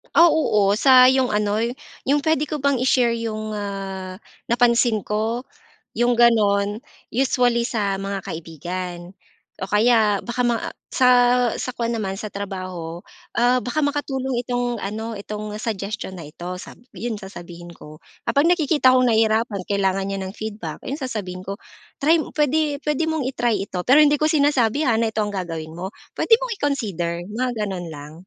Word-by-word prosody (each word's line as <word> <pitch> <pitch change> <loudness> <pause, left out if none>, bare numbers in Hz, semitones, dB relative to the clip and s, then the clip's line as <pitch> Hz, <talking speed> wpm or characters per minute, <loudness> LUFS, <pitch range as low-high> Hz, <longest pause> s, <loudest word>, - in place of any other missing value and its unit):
ah, 340 +1 +8
oo. 210 -10 +2
sa 255 0 +7
yung 260 -3 +2
ano 210 0 +1 0.5
yung 285 +2 +2
puwede 310 0 +1
ko 300 -2 -4
bang 280 -1 +2
i-share 245 -1 +2
yung, 215 -1 -4
ah, 195 -2 -5 0.2
napansin 235 -2 +3
ko, 220 +4 -1 0.6
yung 240 +1 +3
gano'n. 210 -4 +3 0.3
Usually, 245 -1 +2
sa 205 -5 -1
mga 195 0 -4
kaibigan 175 +2 -6 0.5
o 190 - -4
kaya 215 -1 +4
baka 240 +1 -2
maa 240 -2 0 0.2
sa 255 -1 +3 0.5
sa - - -3
kuwan 235 0 -1
naman 205 -4 -2
sa 215 +1 -5
trabaho, 185 -4 -6 0.3
ah, 245 +1 +3
baka 290 +5 -2
makatulong 270 -3 -1
itong 245 -1 -1
ano 220 +3 -4
itong 210 +1 -6
suggestion 210 -2 -4
na 165 - -8
ito 175 +3 -7
sabi 240 - -13
'yon 225 +3 -3
sasabihin 175 -3 -10
ko, 155 -2 -13 0.3
"kapag 285 +2 +2
nakikita 300 -6 +4
kong 255 - +4
nahihirapan 220 -2 +2
kailangan 195 -1 +1
niya 195 0 -3
ng 190 - -7
feedback" 210 -8 -5
iyon 280 - -3
sasabihin 205 -8 -4
ko. 200 0 -5 0.4
"Try 315 +4 +5
mo - - -7
puwede 295 0 +1
puwede 300 +2 0
mong 315 -4 -1
i-try 240 -5 0
ito", 180 -3 -4
pero 280 +4 +7
hindi 295 0 +5
ko - - +4
sinasabi, 285 -2 +2
ha, - - +4
na 225 0 +1
ito 215 - 0
ang 210 - -1
gagawin 165 -4 -5
mo. 185 +2 -4 0.3
Puwede - - +3
mong - - -2
i-consider, 190 - -2
mga 250 +4 -1 0.2
gano'n 180 -4 -5
lang. 145 +1 -10
220 Hz, 165 wpm, -22 LUFS, 195-255 Hz, 0.6 s, ah